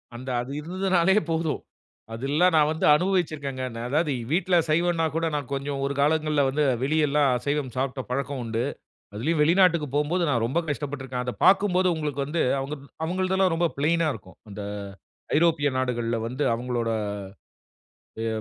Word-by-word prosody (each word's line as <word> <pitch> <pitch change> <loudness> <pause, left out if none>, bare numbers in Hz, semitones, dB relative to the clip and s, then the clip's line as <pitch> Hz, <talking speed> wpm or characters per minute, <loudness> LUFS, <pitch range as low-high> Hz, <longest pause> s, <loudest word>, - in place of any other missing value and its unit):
அந்த 130 +2 -7
அது 125 +3 -7
இருந்ததுனாலே 185 +2 +1 0.2
போதும் 160 -1 -1 0.5
அதெல்லா 140 +9 +1
நான் 150 -1 +4
வந்து 160 0 -1
அனுபவிச்சுருக்கேங்க. 155 -7 -1
ந - - -8
அதாவது 150 +3 +1 0.2
வீட்டில 180 +2 +2
சைவம்னா 165 +1 +2
கூட 165 0 0
நான் 145 -4 -4
கொஞ்சம் 140 0 -3
1 140 - -1
காலங்கள்ல 150 0 +2
வந்து 150 +3 0 0.2
வெளி 150 +4 +1
எல்லாம் 145 0 +3
அசைவம் 140 +2 -2
சாப்பிட்ட 130 +1 -2
பழக்கம் 140 +1 -2
உண்டு. 115 0 -2 0.5
அதிலேயும் 150 +8 0
வெளிநாட்டுக்கு 170 -1 +4
போம்போது 155 +5 +1
நான் 120 -5 +1
ரொம்ப 130 +8 0
கஷ்டப்பட்டு 145 -2 -4
இருக்கேன். 125 -1 -3
அத 125 - -2
பார்க்கும்போது 190 -1 +4
உங்களுக்கு 150 -3 -3
வந்து, 160 +4 -1 0.2
அவுங்க 135 +3 -4 0.3
அவுங்களதெல்லாம் 185 +1 +1
ரொம்ப 170 +1 +2
ஃப்ளெயினா 160 +3 +1
இருக்கும். 95 -5 -13
அந்த 105 0 -7 0.7
ஐரோப்பிய 160 -3 +3
நாடுகள்ல 120 -2 -1
வந்து 130 +5 -3
அவுங்களோட 120 -1 -2 1.3
எ - - -1
150 Hz, 150 wpm, -25 LUFS, 130-170 Hz, 1.3 s, நான்